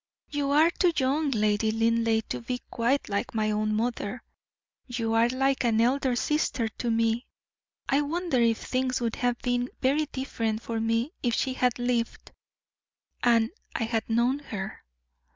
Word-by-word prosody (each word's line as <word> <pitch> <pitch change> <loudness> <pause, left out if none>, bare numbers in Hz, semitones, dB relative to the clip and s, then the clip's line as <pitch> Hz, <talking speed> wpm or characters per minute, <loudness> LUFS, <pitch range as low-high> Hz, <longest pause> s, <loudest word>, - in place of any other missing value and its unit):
"You 290 -1 -1
are 310 +4 +5
too 355 0 +2
young, 280 +3 +1
Lady 215 -2 +1
Linleigh, 225 0 +2
to - - -3
be 245 +1 -3
quite 250 +4 +1
like 200 +2 -2
my 215 -1 +1
own 215 0 0
mother; 230 0 -2 0.6
you 230 -3 -2
are 230 +1 +4
like 270 +1 +1
an 225 -2 +2
elder 255 +2 +2
sister 260 -3 0
to 235 +2 -4
me. 230 +1 +1 0.6
I 275 +2 +3
wonder 310 -3 0
if 230 -1 +3
things 255 0 0
would 230 -2 -2
have 245 -1 +1
been 245 0 0
very 290 +4 +2
different 230 -5 -3
for 230 -1 -3
me 230 +5 0
if 240 -3 +1
she 260 - 0
had 250 -2 +1
lived, 245 -1 -2 0.9
and 230 0 +3 0.2
I - - 0
had 225 0 -2
known 240 +5 +2
her?" 205 -8 -6
240 Hz, 160 wpm, -27 LUFS, 225-260 Hz, 0.9 s, are